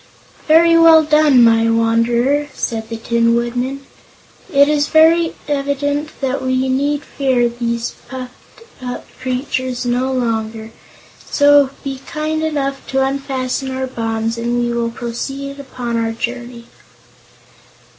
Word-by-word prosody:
"Very 330 +2 +6
well 325 -1 +7
done, 300 -4 +5
my 230 0 +4
Wanderer," 235 +5 +1
said 225 -2 -3
the 230 - -4
Tin 230 0 +1
Woodman. 250 +3 -2 0.7
"It 280 -2 +5
is 295 -1 +1 0.6
evident 285 +1 -2
that 270 0 -1
we 260 0 0
need 285 +2 0
fear 260 -4 0
these 235 0 -3 0.2
puffed 255 - -10 0.2
up 250 -1 -6
creatures 255 -1 -3
no 250 +2 0
longer, 225 -3 -2 0.6
so 285 -1 +5
be 270 -1 -5
kind 310 0 -2
enough 275 -3 -2
to 265 0 +1
unfasten 270 -1 -3
our 260 0 -3
bonds 225 -2 -3
and 240 +1 -1
we 240 0 0
will 235 -1 -1
proceed 270 +4 -6
upon 250 -4 -4
our 225 0 -1
journey." 240 0 -5
255 Hz, 125 wpm, -17 LUFS, 235-280 Hz, 0.7 s, well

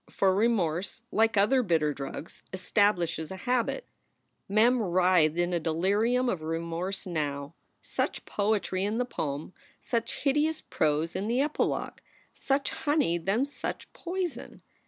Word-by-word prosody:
For 190 -1 +2
remorse, 200 -2 0
like 225 0 +3
other 255 +7 +4
bitter 160 -8 +1
drugs, 140 +3 -7
establishes 180 -4 +1
a 190 - -6
habit. 250 - -1 0.6
Mem 230 +4 +4
writhed 180 -4 +3
in 175 0 +1
a 170 - +2
delirium 205 +10 +1
of 185 -9 -1
remorse 170 +4 -3
now. 145 -4 -3 0.3
Such - - -2
poetry 200 -2 0
in 210 +3 0
the 250 - +1
proem, 150 - -4 0.3
such 230 -2 -2
hideous 300 +3 +2
prose 155 +2 0
in 200 - -2
the 240 +3 +1
epilogue! 295 +2 -1 0.3
Such 275 0 0
honey, 290 - +1
then 195 +10 +1
such 285 - -6
poison! 360 -1 -5
195 Hz, 135 wpm, -28 LUFS, 165-240 Hz, 0.6 s, other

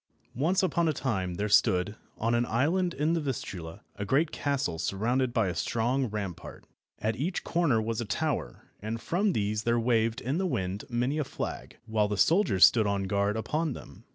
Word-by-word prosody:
ONCE 175 - +1
upon 170 -1 +1
a 155 - +2
time 95 -10 -2
there 105 +3 -1
stood, 100 -1 +3 0.2
on 115 +2 0
an 120 +1 +1
island 170 +10 +1
in 150 +4 +1
the 165 - 0
Vistula, 95 - -5
a 105 - -4
great 145 +9 +2
castle 130 - -1
surrounded 120 +9 0
by 115 -4 +1
a 90 - -1
strong 125 +7 0
rampart. 100 -5 -6 0.3
At 110 +1 -1
each 170 +8 -2
corner 165 -9 +2
was 115 +1 -2
a - - -3
tower, 150 +5 -2 0.2
and 110 +2 -3
from 190 - 0
these 105 -2 0
there 115 +1 +1
waved 115 0 +1
in 135 +7 -2
the 190 - 0
wind 100 - -2
many 125 +5 0
a - - +1
flag, - - -6
while 110 -2 +1
the 105 -1 -2
soldiers 160 - +5
stood 110 -3 +3
on 100 -1 0
guard 100 +2 0
upon 150 +7 -1
them. - - -12
115 Hz, 190 wpm, -29 LUFS, 105-145 Hz, 0.3 s, soldiers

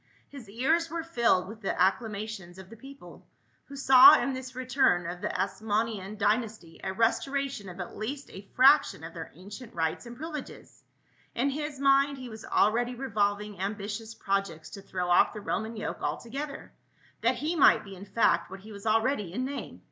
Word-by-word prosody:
His 265 -7 -11
ears 315 +10 +1
were 335 0 -4
filled 235 - +2
with 220 +2 -10
the 195 - -3
acclamations 200 -1 -1
of 190 +1 -12
the - - -10
people 275 +5 -13 0.4
who 280 - -11
saw 265 -2 +8
in 275 - -1
this 260 0 -7
return 255 -8 +2
of 175 +1 -6
the - - -2
Asmonean 215 -2 -2
dy 210 +1 +3
nasty 215 -8 -9
a 190 - -2
restoration 235 +1 -1
of 180 +1 -10
at 180 - -6
least 270 +6 -5
a 195 +1 -11
fraction 270 - +5
of 165 +1 -8
their 165 -1 -7
ancient 205 +7 -11
rights 160 +7 -2
and 235 0 -10
privileges; 305 -1 -8 0.5
in 270 +4 +1
his 295 0 -5
mind 275 0 +3
he 255 -2 -8
was 220 -1 -10
already 240 +4 +2
revolving 210 -5 -1
ambitious 210 +2 -4
projects 195 -7 -2
to 200 - -9
throw 180 -2 -4
off 175 - +4
the 215 - -6
Roman 220 +2 -3
yoke - - -5
altogether, 270 - -5 0.5
that - - +2
he 315 +4 -2
might 305 - +5
be 195 -2 -10
in 190 +2 -10
fact 205 +4 +2
what 190 +1 -9
he 215 +2 -12
was 200 +1 -8
already 220 -3 +1
in 250 +7 -2
name. 280 +1 -6
220 Hz, 185 wpm, -28 LUFS, 195-265 Hz, 0.5 s, saw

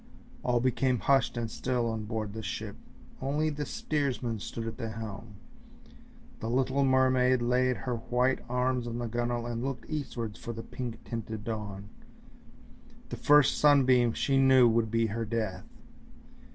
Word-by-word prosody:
All 120 -1 +1
became 130 +1 +1
hushed 135 0 +2
and 120 -1 -1
still 125 -1 -1
on 110 -2 -3
board 110 -2 -4
the 110 - -5
ship, 95 - -5 0.5
only 150 +4 0
the 145 0 -4
steersman 130 -7 -2
stood 115 +1 -5
at 115 - -5
the 115 - -3
helm, 110 -1 -7 1.0
the 115 - -4
little 130 +3 +1
mermaid 130 -1 +4
laid 125 +1 +2
her 125 -2 -3
white 125 +3 +1
arms 125 0 0
on 115 0 -4
the 120 - -3
gunwale 120 +1 -2
and 120 0 -3
looked 135 -2 -4
eastwards 120 -8 -4
for 120 - -5
the 115 0 -7
pink 120 -3 -6
tinted 110 -2 -5
dawn; 105 -3 -5 1.2
the - - -4
first 145 -2 +4
sunbeam 130 -5 +5
she 135 +2 +1
knew 130 -2 +6
would 115 -1 +2
be 115 +1 +2
her 110 +1 -2
death. 110 -4 -3
120 Hz, 155 wpm, -29 LUFS, 115-130 Hz, 1.2 s, knew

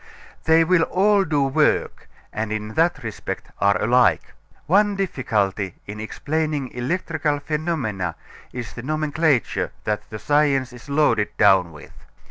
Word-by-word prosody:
They 160 +1 +5
will 175 +1 +3
all 200 +4 +3
do 145 -3 +1
work, 135 - 0 0.2
and 110 0 -3
in 110 0 -4
that 165 +1 +1
respect 110 -2 -6
are 100 -2 +3
alike. 125 +3 +2 0.3
One 205 +4 +3
difficulty 105 - -1
in 105 +1 -7
explaining 150 +4 -2
electrical 150 +3 -2
phenomena 145 - -2 0.4
is 120 -2 -6
the 120 - -7
nomenclature 155 -1 0
that 105 -1 -3
the 110 - -6
science 135 0 +1
is 125 +3 -13
loaded 140 -7 +2
down 95 -5 +4
with. 75 - -13
135 Hz, 130 wpm, -22 LUFS, 110-160 Hz, 0.4 s, They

